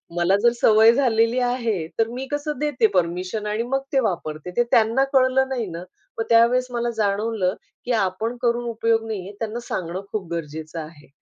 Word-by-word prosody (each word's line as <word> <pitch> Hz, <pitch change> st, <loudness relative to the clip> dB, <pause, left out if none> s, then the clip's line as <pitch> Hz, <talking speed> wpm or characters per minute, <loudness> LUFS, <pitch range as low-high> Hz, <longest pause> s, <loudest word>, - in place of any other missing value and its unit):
मला 175 Hz, +3 st, +3 dB
जर 235 Hz, -, +6 dB
सवय 220 Hz, +1 st, +7 dB
झालेली 235 Hz, -2 st, +2 dB
आहे 235 Hz, -9 st, -1 dB
तर 225 Hz, -, +3 dB
मी 260 Hz, +2 st, -4 dB
कसं 290 Hz, 0 st, -2 dB
देते 290 Hz, -6 st, +2 dB
परमिशन 180 Hz, +4 st, -1 dB
आणि 215 Hz, +2 st, -1 dB
मग 270 Hz, +2 st, -1 dB
ते 270 Hz, -, +4 dB
वापरते 175 Hz, -, -3 dB
ते 240 Hz, -, +5 dB
त्यांना 230 Hz, +4 st, +4 dB
कळलं 265 Hz, 0 st, +3 dB
नाही 245 Hz, -4 st, -2 dB
ना 170 Hz, +1 st, -6 dB, 0.3 s
मग 225 Hz, -, 0 dB
त्यावेळेस 235 Hz, +2 st, +4 dB
मला 240 Hz, 0 st, -1 dB
जाणवलं 205 Hz, -2 st, 0 dB, 0.3 s
की 245 Hz, -, -2 dB
आपण 195 Hz, +5 st, -1 dB
करून 240 Hz, 0 st, +1 dB
उपयोग 225 Hz, 0 st, 0 dB
नाही 220 Hz, -3 st, -3 dB
आहे -, -, -8 dB
त्यांना 225 Hz, +1 st, -3 dB
सांगणं 180 Hz, +1 st, -3 dB
खूप 200 Hz, -5 st, -3 dB
गरजेचं 160 Hz, 0 st, -5 dB
आहे. 155 Hz, -1 st, -10 dB
225 Hz, 180 wpm, -23 LUFS, 185-245 Hz, 0.3 s, सवय